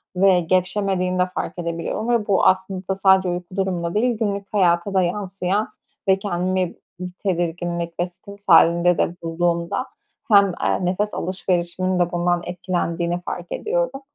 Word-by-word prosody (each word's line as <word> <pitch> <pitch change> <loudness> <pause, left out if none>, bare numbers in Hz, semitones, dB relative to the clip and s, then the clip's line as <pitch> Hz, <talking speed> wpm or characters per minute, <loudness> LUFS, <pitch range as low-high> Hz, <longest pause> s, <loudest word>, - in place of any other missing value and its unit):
ve 185 0 +5
gevşemediğini 185 +1 0
de 180 - +4
fark - - -4
edebiliyorum 170 +6 -3
ve 235 -3 +1
bu 195 -3 +3
aslında 190 0 +1
sadece 190 -1 +4
uyku 175 +1 -5
durumunda 180 -3 -1
değil, 235 +2 +1
günlük 200 -2 -3
hayata 180 -1 +2
da 190 - +3
yansıyan 190 +2 -1 0.4
ve 190 0 +4
kendimi 185 -2 -1 0.2
bir 180 0 -5
tedirginlik 170 -2 -2
ve 175 - +2
stres 200 +3 -14
hâlinde 170 +1 +5
de 170 - 0
bulduğumda 170 +6 -1 0.5
hem, 200 -1 +8 0.2
eee, 185 - +1
nefes 200 +4 -1
alışverişimin 185 0 -1
de 175 -1 +1
bundan 175 0 +1
etkilendiğini 175 -1 -2
fark 175 0 -6
ediyorum. - - -1
185 Hz, 145 wpm, -22 LUFS, 175-195 Hz, 0.5 s, hem